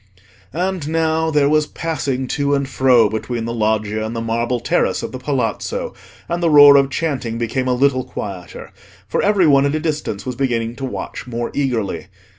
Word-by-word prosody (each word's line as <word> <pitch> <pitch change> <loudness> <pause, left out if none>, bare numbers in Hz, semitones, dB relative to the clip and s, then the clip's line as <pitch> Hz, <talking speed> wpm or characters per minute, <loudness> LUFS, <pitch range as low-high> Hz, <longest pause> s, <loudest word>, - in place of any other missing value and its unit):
And 180 -3 -2
now 160 0 +1
there 150 -2 +3
was 150 0 +2
passing 140 -6 -3
to 145 0 +1
and 140 -1 -1
fro 130 -4 +4
between 115 +2 -4
the 115 - -3
Loggia 110 -1 0
and 110 +2 -4
the - - -2
marble 115 +2 -1
terrace 120 - 0
of - - -4
the 130 - -6
Palazzo, 125 -5 -2 0.3
and 170 +1 -2
the 170 - +2
roar 145 -2 +9
of 140 -1 +4
chanting 135 -7 -2
became 120 +3 -2
a 125 - +2
little 130 0 +2
quieter, 95 -7 -8 0.4
for - - 0
every 200 -3 +3
one 140 -2 +4
at 140 - -1
a - - 0
distance 150 -10 -3
was 125 -1 -4
beginning 120 -3 -1
to 135 - -4
watch 130 - -6
more 120 -1 -4
eagerly. 120 -8 -2
130 Hz, 190 wpm, -19 LUFS, 115-150 Hz, 0.4 s, roar